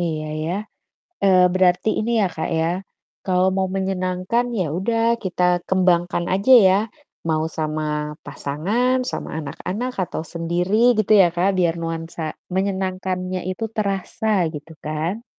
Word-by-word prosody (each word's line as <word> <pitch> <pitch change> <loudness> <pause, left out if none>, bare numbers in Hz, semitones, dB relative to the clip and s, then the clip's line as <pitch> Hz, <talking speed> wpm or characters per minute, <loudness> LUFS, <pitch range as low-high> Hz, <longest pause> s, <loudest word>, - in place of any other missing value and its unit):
Iya 155 -3 -2 0.2
ya, 165 - -2 0.7
eee, 185 -2 +6
berarti 185 +3 +3
ini 230 +2 -1
ya - - +3
Kak 160 - -2
ya, 160 - +2 0.6
kalau 185 0 +2
mau 190 0 +1
menyenangkan 190 +4 -1
ya 180 - +1
udah 225 +4 0 0.2
kita 180 -1 -1 0.2
kembangkan 175 -2 +2
aja 200 +7 +2 0.2
ya, 185 - +5 0.5
mau 155 -1 +1
sama 155 0 -1 0.4
pasangan, 210 - -1 0.2
sama - - -5
anak-anak, 200 - -4
atau 160 -1 -5
sendiri 175 +4 -1 0.2
gitu 215 - 0
ya 175 - +6
Kak, 180 +3 +2
biar 170 -2 +3
nuansa 165 0 -5 0.3
menyenangkannya 185 -1 -2
itu 225 +4 -3
terasa 200 -1 0
gitu 150 +2 -9
kan. 165 +9 -2
185 Hz, 135 wpm, -22 LUFS, 165-195 Hz, 0.7 s, eee